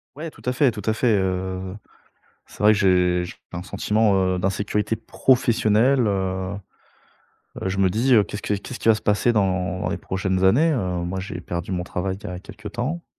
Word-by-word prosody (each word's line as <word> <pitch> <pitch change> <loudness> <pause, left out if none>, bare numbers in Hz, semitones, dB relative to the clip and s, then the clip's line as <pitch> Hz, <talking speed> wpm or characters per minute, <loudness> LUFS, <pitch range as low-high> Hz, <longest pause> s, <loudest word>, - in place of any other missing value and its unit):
Ouais, 155 +2 -6
tout - - -18
à 125 - 0
fait, 130 -1 +3
tout 105 - -7
à 110 - +2
fait, 110 -1 +2
heu, 95 0 -3 0.7
c'est - - -17
vrai 105 +1 +6
que 105 - +2
j'ai 90 -2 +3
j'ai 90 - -8 0.2
p 85 - -5
un 90 - -4
sentiment, 105 +1 +1 0.2
heu, - - -2
d'insécurité 100 +3 -1
professionnelle, 115 +1 +2
heu, 95 -1 -1 1.1
heu, - - -1
je 95 +1 -3
me 95 -1 +4
dis, 120 +7 +2
heu, 105 -3 +6
qu'est-ce 105 - -7
que 105 - 0
qu'est-ce 105 +5 -7
qui - - 0
va 110 - +7
se - - -8
passer 105 +3 +2
dans 95 -2 0
les - - -1
prochaines 95 0 -1
années, 150 +12 +4
heu? - - 0 0.3
Moi 95 +2 -3
j'ai 95 -2 -6
perdu 85 +1 -5
mon 90 -1 -2
travail 95 +2 -3
il - - -22
y - - -3
a 90 -1 -6
quelque 105 - -12
temps. 130 - -3
100 Hz, 215 wpm, -23 LUFS, 95-115 Hz, 1.1 s, va